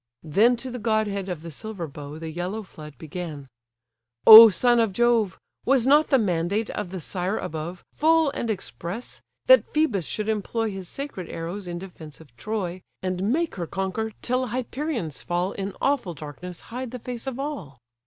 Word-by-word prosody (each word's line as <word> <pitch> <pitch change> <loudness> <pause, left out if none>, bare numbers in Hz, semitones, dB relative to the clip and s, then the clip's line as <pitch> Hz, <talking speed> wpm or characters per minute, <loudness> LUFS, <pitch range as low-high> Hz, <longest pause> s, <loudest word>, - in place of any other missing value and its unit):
Then 210 +10 +4
to 255 +2 -7
the 250 - -5
godhead 210 -3 0
of 170 -3 -5
the 165 - -7
silver 205 +1 -6
bow 145 0 -9
The 160 0 -6
yellow 180 +6 -4
flood 150 -5 -12
began: 155 -3 -7 0.8
"O 225 +1 +13
son 240 +5 +3
of 225 -4 +1
Jove! 235 -3 +2 0.3
Was 260 -2 +3
not 295 +3 +5
the 270 - +4
mandate 200 0 0
of 210 -4 -4
the 190 0 -5
sire 185 +5 -2
above 165 +3 -5
Full 320 -1 +3
and 235 - -3
express, 185 - -5 0.2
that - - +6
Phœbus 245 - +1
should 215 0 -3
employ 220 +1 -1
His 190 -2 -7
sacred 275 - -6
arrows 175 +4 -5
in 175 0 -4
defence 170 -5 -10
of 145 -7 -17
Troy, 185 - -4 0.2
And 185 +3 -1
make 330 +4 0
her 170 -2 -3
conquer, 195 +5 -3
till 255 +1 0
Hyperion's 245 - -3
fall 175 +2 -1
In 195 -1 -5
awful 270 -12 0
darkness 165 +4 -8
hide 255 0 -4
the 250 - -6
face 245 +1 -7
of 260 -2 -3
all?" 215 - -5
200 Hz, 175 wpm, -25 LUFS, 175-240 Hz, 0.8 s, O